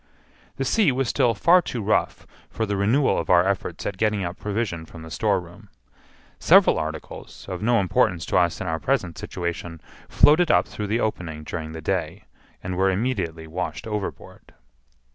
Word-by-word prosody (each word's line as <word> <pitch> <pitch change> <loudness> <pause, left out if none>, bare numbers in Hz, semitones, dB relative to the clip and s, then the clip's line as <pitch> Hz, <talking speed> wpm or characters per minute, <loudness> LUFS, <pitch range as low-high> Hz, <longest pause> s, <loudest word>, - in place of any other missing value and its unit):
The - - -2
sea 210 -10 +3
was 130 -1 -1
still 125 -5 +2
far 175 - +5
too 125 - -5
rough 105 - 0 0.2
for 110 - -2
the 100 -1 -2
renewal 115 +9 +2
of - - -5
our 90 0 +5
efforts 95 -3 -3
at 100 - -3
getting 105 -3 +1
up 85 0 -4
provision 105 -5 -3
from 80 0 -12
the 80 - -10
storeroom. 95 +1 -2 0.7
Several - - +5
articles, 80 0 -7
of 90 -1 -5
no 115 +2 +3
importance 90 -3 +1
to - - 0
us 85 -2 +2
in - - -4
our 80 -2 -2
present 95 - -1
situation, 85 -2 -5 0.3
floated 160 +3 +5
up - - +4
through 105 - -5
the 110 +3 0
opening 85 -9 -3
during 80 0 -6
the 80 - -7
day, - - -2 0.4
and 90 0 -4
were 95 +1 +3
immediately 95 -6 -2
washed 85 +3 -5
overboard. 105 -3 -6
95 Hz, 175 wpm, -24 LUFS, 85-110 Hz, 0.7 s, far